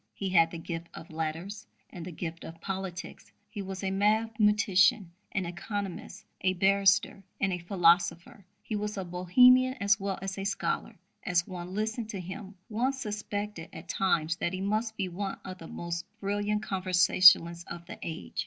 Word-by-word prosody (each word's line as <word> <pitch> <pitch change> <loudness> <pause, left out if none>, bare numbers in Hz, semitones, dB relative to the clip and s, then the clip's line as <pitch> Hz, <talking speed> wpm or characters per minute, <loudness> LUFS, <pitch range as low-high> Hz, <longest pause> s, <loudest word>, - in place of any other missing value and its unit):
He 195 - -3
had 165 -3 +5
the 170 - -7
gift 165 0 -6
of 165 - -10
letters 160 - -4 0.2
and 175 - -8
the 180 - -6
gift 165 0 -6
of 165 0 -9
politics; 190 -1 -6 0.2
he 210 -2 -5
was 190 0 -6
a 190 - 0
mathematician, 210 -2 +3 0.2
an 190 -2 -1
economist, 195 +2 -5 0.2
a 185 0 +2
barrister, 195 +1 +3 0.2
and 195 -1 +1
a 180 - -2
philosopher; 175 +2 +2 0.2
he 215 - -4
was 210 0 -3
a 190 - -2
Bohemian 250 +9 +5
as 200 +1 +3
well 195 -1 -2
as 195 0 -5
a - - -3
scholar; 200 +1 -2 0.3
as 175 -1 +1
one 180 0 -7
listened 220 +1 -2
to 205 -4 -5
him, 190 +2 -8
one 240 +5 0
suspected 210 -7 -4
at 165 +2 -10
times 170 -4 +1
that 175 - -2
he 185 - -3
must 215 +3 -1
be 195 - -1
one 195 +2 -4
of 185 0 -7
the 165 - -9
most 170 0 -4 0.2
brilliant 205 +1 -1
conversationalists 180 -3 +5
of 170 0 -8
the - - -9
age. 165 0 -6
190 Hz, 170 wpm, -29 LUFS, 175-205 Hz, 0.3 s, had